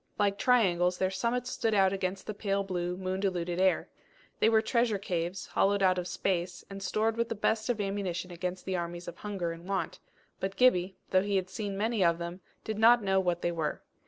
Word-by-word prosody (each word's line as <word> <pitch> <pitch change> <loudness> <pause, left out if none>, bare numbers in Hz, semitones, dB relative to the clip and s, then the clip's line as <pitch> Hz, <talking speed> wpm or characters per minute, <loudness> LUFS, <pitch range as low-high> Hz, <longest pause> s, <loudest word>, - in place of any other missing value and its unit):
Like 200 -1 +1
triangles 180 -8 +3
their 185 0 +1
summits 235 +5 -1
stood 225 -2 0
out 190 -1 +4
against 190 0 -3
the 215 - -4
pale 200 -1 -1
blue, 180 -2 -2
moon 185 0 -2
diluted 180 -3 -1
air. 190 -1 +3 0.5
They 220 - +5
were 220 -1 +5
treasure 235 -2 +2
caves, 175 -1 -3
hollowed 200 0 +2
out 185 -1 +4
of 180 - -4
space, 180 -1 -2
and 195 0 -7
stored 215 +4 0
with 235 0 0
the 230 - -2
best 220 +2 0
of 240 -3 0
ammunition 195 -3 -2
against 180 +1 -4
the 190 - -1
armies 175 0 -4
of 175 - -7
hunger 195 -5 -3
and 165 +2 -9
want; 195 -1 -2 0.4
but 190 0 -3
Gibbie, 190 -5 +3
though 185 - +5
he 200 0 -1
had 190 -1 -1
seen 205 -4 -4
many 220 0 +1
of 170 -1 +3
them, 170 +2 -6 0.2
did 215 -1 -4
not 235 +1 +6
know 190 -1 +3
what 175 -2 0
they 175 - +1
were. 160 -3 -3
190 Hz, 215 wpm, -30 LUFS, 180-210 Hz, 0.5 s, not